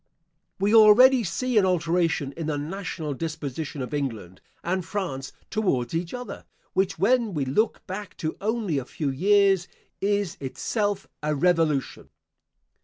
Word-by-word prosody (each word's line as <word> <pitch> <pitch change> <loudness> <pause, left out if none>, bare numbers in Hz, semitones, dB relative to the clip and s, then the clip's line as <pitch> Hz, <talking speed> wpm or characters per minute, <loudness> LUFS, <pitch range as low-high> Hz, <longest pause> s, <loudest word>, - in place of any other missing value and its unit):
We 200 +3 +2
already 230 +4 +7
see 245 +4 +1
an 195 - +3
alteration 165 -4 +1
in 165 -2 -4
the 150 -2 -1
national 160 -1 -4
disposition 150 -1 -4
of 125 - -7
England 110 -11 -4 0.2
and 185 +2 -1
France 165 -9 -4 0.2
towards 175 - 0
each 170 +1 -2
other, 250 0 -7 0.3
which, 190 -3 +1
when 225 +1 +2
we 145 -3 0
look 210 - 0
back 195 +1 -7
to 155 -2 -3
only 210 -8 0
a 130 - -7
few 145 +1 -3
years, 195 +4 +3 0.3
is 200 -3 0
itself 205 - -2 0.2
a 150 0 0
Revolution. 160 -3 +1
175 Hz, 140 wpm, -25 LUFS, 145-205 Hz, 0.3 s, already